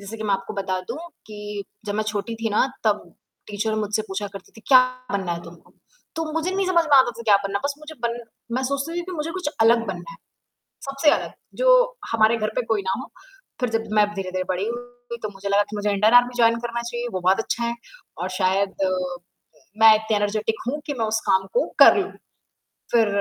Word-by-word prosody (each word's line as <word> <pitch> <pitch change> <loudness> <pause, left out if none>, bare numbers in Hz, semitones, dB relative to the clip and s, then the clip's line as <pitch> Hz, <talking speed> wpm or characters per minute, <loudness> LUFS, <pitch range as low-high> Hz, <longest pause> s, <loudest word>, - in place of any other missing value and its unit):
जैसे 200 +3 -8
कि 220 - -6
मैं 205 - +1
आपको 195 0 -5
बता 190 -2 -2
दूँ 300 - -4 0.3
कि, 210 -1 -6 0.2
जब 205 - -3
मैं 215 - 0
छोटी 215 +2 -3
थी 225 - 0
ना 210 +5 +3 0.2
तब 210 -1 +2 0.4
टीचर 215 +1 -2
मुझसे 215 0 -1
पूछा 195 +2 -3
करती 195 -2 -11
थी, 225 - -15
"क्या 260 -2 +9 0.3
बनना 190 -3 -1
है 170 0 -5
तुमको?" 170 -1 -15 0.4
तो 325 - -1
मुझे 325 +3 -1
नहीं 385 0 0
समझ 345 -3 +3
में 295 -3 +5
आता 260 -2 +6
था 235 - -10
क्या 210 -3 +5
बनना 200 0 -1
है, - - -11
बस 280 0 0
मुझे 305 +1 -10
बन 235 0 -3 0.4
मैं 260 - 0
सोचती 280 +6 -2
थी - - -2
कि 370 - -7
मुझे 320 -1 -3
कुछ 365 -4 -3
अलग 230 +1 +5
बनना 175 -3 -6
है, 200 - -11 0.7
सबसे 275 +2 +2
अलग, - - 0 0.2
जो - - +4
हमारे 225 0 +4
घर 215 -1 -1
पे - - +1
कोई 220 -2 0
ना 190 -1 -2
हो। 260 - -8 0.5
फिर 250 -2 0
जब 225 0 -1
मैं 210 -1 +5
धीरे-धीरे 185 -2 -3
बड़ी 185 +2 -1
हुई 245 0 -7
तो 215 - -2
मुझे 200 0 -6
लगा 200 +1 +4
कि 215 - -6
मुझे 205 0 -1
इंडियन 210 +3 +3
आर्मी 245 0 +6
जॉइन 230 -1 +5
करना 235 0 -3
चाहिए, 240 0 -4
वो 185 - -1
बहुत 185 +4 +3
अच्छा 235 +1 -2
है, 235 0 0 0.4
और 180 - -3
शायद 190 +1 0 1.0
मैं 220 0 +9
इतनी 220 0 -1
एनर्जेटिक 210 +2 0
हूँ 290 +4 -1
कि 290 - -1
मैं 225 - +2
उस 220 +1 0
काम 190 0 +3
को - - +2
कर - - +9
लूँ। 390 -1 -1 0.8
फिर 230 -2 +4
220 Hz, 225 wpm, -23 LUFS, 200-250 Hz, 1.0 s, क्या